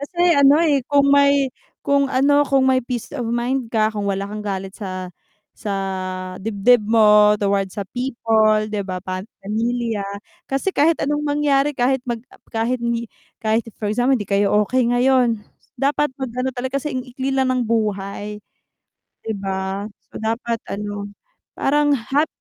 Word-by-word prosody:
Kasi 345 Hz, +4 st, +2 dB
ano, 280 Hz, +1 st, +7 dB
eh, 285 Hz, -4 st, +3 dB
kung 280 Hz, -1 st, +4 dB
may 280 Hz, -2 st, +4 dB, 0.3 s
kung 280 Hz, -1 st, +2 dB
ano 285 Hz, +2 st, +3 dB
kung 270 Hz, -1 st, +3 dB
may 260 Hz, 0 st, +3 dB
peace 240 Hz, -1 st, -5 dB
of 240 Hz, -, -3 dB
mind 240 Hz, +1 st, -1 dB
ka, 220 Hz, -1 st, +1 dB
kung 205 Hz, -1 st, -2 dB
wala 195 Hz, 0 st, -1 dB
kang 210 Hz, +1 st, -6 dB
galit 195 Hz, -2 st, -4 dB
sa, 185 Hz, -3 st, -5 dB, 0.4 s
sa 205 Hz, -3 st, -4 dB, 0.7 s
dibdib 220 Hz, +3 st, +3 dB
mo 210 Hz, -1 st, +6 dB
towards 200 Hz, -1 st, -1 dB
sa 200 Hz, -, -3 dB
people 225 Hz, -4 st, +2 dB
'di 210 Hz, -1 st, -3 dB
ba, 185 Hz, -1 st, -3 dB
pam 185 Hz, +3 st, -5 dB, 0.2 s
pamilya 230 Hz, +1 st, -1 dB, 0.5 s
kasi 275 Hz, +8 st, -1 dB
kahit 320 Hz, +1 st, +3 dB
anong 295 Hz, +1 st, 0 dB
mangyari 290 Hz, -1 st, +1 dB
kahit 265 Hz, +1 st, +2 dB
mag 235 Hz, -2 st, -2 dB, 0.3 s
kahit 235 Hz, +2 st, -1 dB, 0.6 s
kahit 220 Hz, +1 st, +3 dB, 0.2 s
for 210 Hz, -1 st, -2 dB
example 250 Hz, +3 st, +2 dB
di 205 Hz, -, -4 dB
kayo 200 Hz, +1 st, +2 dB
okey 250 Hz, +2 st, +1 dB
ngayon, 245 Hz, -1 st, +3 dB, 0.4 s
dapat 290 Hz, +2 st, +1 dB
mag-ano 255 Hz, -1 st, -3 dB
talaga 260 Hz, +2 st, -2 dB
kasi 295 Hz, -1 st, -4 dB
ang 255 Hz, -, -3 dB
ikli 260 Hz, +1 st, -5 dB
lang 265 Hz, -1 st, +1 dB
ng 255 Hz, -, 0 dB
buhay, 210 Hz, -2 st, -2 dB, 0.8 s
'di 225 Hz, -, -3 dB
ba? 195 Hz, +1 st, -3 dB, 0.2 s
So, -, -, -7 dB
dapat 230 Hz, +1 st, -2 dB
ano, 205 Hz, 0 st, -4 dB, 0.5 s
parang 290 Hz, 0 st, +2 dB
hap 275 Hz, +6 st, 0 dB
235 Hz, 155 wpm, -21 LUFS, 210-270 Hz, 0.8 s, ano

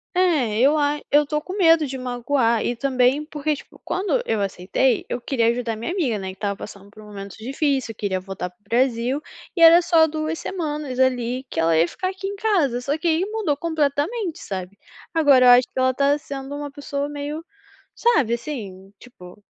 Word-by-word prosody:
É, 300 Hz, -, +2 dB
eu 275 Hz, +5 st, +5 dB
a 295 Hz, 0 st, +1 dB
eu 295 Hz, +1 st, +5 dB
tô 300 Hz, +1 st, -2 dB
com 365 Hz, +5 st, -8 dB
medo 330 Hz, -5 st, +5 dB
de 270 Hz, -1 st, -5 dB
magoar, 245 Hz, -2 st, 0 dB
e 240 Hz, -, -1 dB
também 260 Hz, +2 st, +1 dB
porque, 300 Hz, -1 st, -2 dB
tipo, -, -, -14 dB
quando 395 Hz, +6 st, 0 dB
eu 215 Hz, -, 0 dB
aceitei, 200 Hz, +6 st, 0 dB
eu 245 Hz, -, -4 dB
queria 235 Hz, -2 st, 0 dB
ajudar 235 Hz, -1 st, -2 dB
minha 230 Hz, +9 st, -4 dB
amiga, 300 Hz, -, 0 dB
né, 190 Hz, -1 st, -5 dB
que -, -, -7 dB
estava 200 Hz, +1 st, -3 dB
passando 200 Hz, 0 st, -10 dB
por 215 Hz, +1 st, -15 dB
um -, -, -13 dB
momento 200 Hz, -2 st, -9 dB
difícil, 270 Hz, 0 st, -1 dB
queria 200 Hz, -3 st, -2 dB
voltar 185 Hz, -1 st, -6 dB
para 180 Hz, -, -33 dB
o -, -, -41 dB
Brasil, 245 Hz, +4 st, 0 dB, 0.3 s
e 340 Hz, -, -1 dB
era 335 Hz, +1 st, +8 dB
só 330 Hz, -2 st, +4 dB
2 315 Hz, +1 st, -3 dB
semanas 300 Hz, -7 st, -4 dB
ali, 255 Hz, -1 st, +1 dB
que -, -, -4 dB
ela 165 Hz, 0 st, +3 dB
ia 165 Hz, +2 st, +4 dB
ficar 370 Hz, -, -3 dB
aqui 380 Hz, 0 st, -7 dB
em 400 Hz, -, -4 dB
casa. 340 Hz, -, +1 dB
Só 285 Hz, +4 st, -1 dB
que 340 Hz, -, -3 dB
aí 325 Hz, +2 st, +2 dB
mudou 420 Hz, -8 st, -1 dB
completamente, 320 Hz, -, -1 dB
sabe, 190 Hz, -1 st, -6 dB, 0.4 s
agora 285 Hz, -6 st, +5 dB
eu -, -, +8 dB
acho 245 Hz, 0 st, +6 dB
que -, -, -15 dB
ela 260 Hz, 0 st, +3 dB
tá 280 Hz, +2 st, +2 dB
sendo 275 Hz, -1 st, -7 dB
uma 290 Hz, 0 st, -6 dB
pessoa 285 Hz, 0 st, -4 dB
meio 295 Hz, +2 st, -5 dB, 0.5 s
sabe, 295 Hz, -, +2 dB
assim, 205 Hz, -7 st, -7 dB
tipo 205 Hz, -5 st, -15 dB
270 Hz, 200 wpm, -22 LUFS, 230-310 Hz, 0.5 s, era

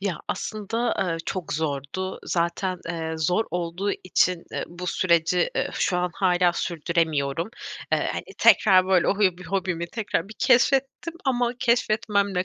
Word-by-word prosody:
Ya, 190 Hz, -6 st, -2 dB
aslında, 215 Hz, +5 st, -2 dB
eee, 175 Hz, -3 st, 0 dB
çok 185 Hz, -4 st, -3 dB
zordu. 150 Hz, +5 st, -3 dB
Zaten, 180 Hz, +2 st, -1 dB
eee, 160 Hz, -1 st, -3 dB
zor 180 Hz, +8 st, +1 dB
olduğu 180 Hz, +3 st, -2 dB
için, 180 Hz, -1 st, +1 dB
eee, -, -, -2 dB
bu 175 Hz, +1 st, -8 dB
süreci, 170 Hz, 0 st, +2 dB
eee, -, -, 0 dB
şu 180 Hz, -, +1 dB
an 180 Hz, 0 st, 0 dB
hâlâ 180 Hz, -2 st, +3 dB
sürdüremiyorum. 165 Hz, -2 st, -1 dB, 0.4 s
Eee, -, -, +1 dB
hani, -, -, -4 dB
tekrar, 185 Hz, -3 st, +6 dB
böyle, 185 Hz, -2 st, +3 dB
o 200 Hz, -, +1 dB
hü 185 Hz, -4 st, +3 dB
bü 185 Hz, -, -10 dB
hobimi 180 Hz, -2 st, -2 dB
tekrar 200 Hz, -2 st, -2 dB
bir 220 Hz, -, -10 dB
keşfettim 270 Hz, +5 st, +2 dB
ama 245 Hz, -2 st, +1 dB
keşfetmemle 215 Hz, -6 st, +1 dB
180 Hz, 150 wpm, -25 LUFS, 170-205 Hz, 0.4 s, tekrar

